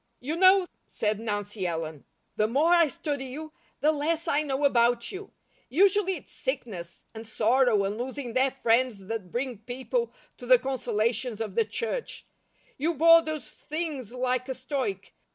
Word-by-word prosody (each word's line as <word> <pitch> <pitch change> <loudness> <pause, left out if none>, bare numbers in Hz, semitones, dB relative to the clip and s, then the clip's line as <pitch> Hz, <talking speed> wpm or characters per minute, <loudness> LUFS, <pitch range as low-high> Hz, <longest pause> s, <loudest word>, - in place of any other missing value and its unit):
"You 295 +6 -3
know," 375 +1 +6 0.2
said 210 -1 -1
Nancy 205 -3 -3
Ellen, 160 -3 -4 0.3
"the 215 - +2
MORE 285 +8 +2
I 340 -2 +6
study 290 -3 -4
you, 305 +4 -8 0.3
the 305 - +4
LESS 315 +2 -1
I 290 - +2
know 285 -1 -1
about 235 -2 +2
you. 390 +1 -8 0.4
Usually 385 - +3
it's - - -12
sickness, 185 - -5
and 220 0 -9
sorrow, 225 0 +3
and 205 +3 -2
losing 255 -1 -5
their 260 +2 +3
friends 240 -5 +1
that 200 -4 -5
bring 245 -3 -3
people 260 - -3 0.3
to - - -9
the - - +8
consolations 235 - -1
of 215 -4 -4
the 230 +2 +2
church. 465 - -4 0.5
You 325 +4 0
bore 330 +2 +7
those 310 -2 -5
things 300 -7 -5
like 255 +1 -1
a 260 - -2
stoic. 275 +8 -4
260 Hz, 160 wpm, -27 LUFS, 225-310 Hz, 0.5 s, the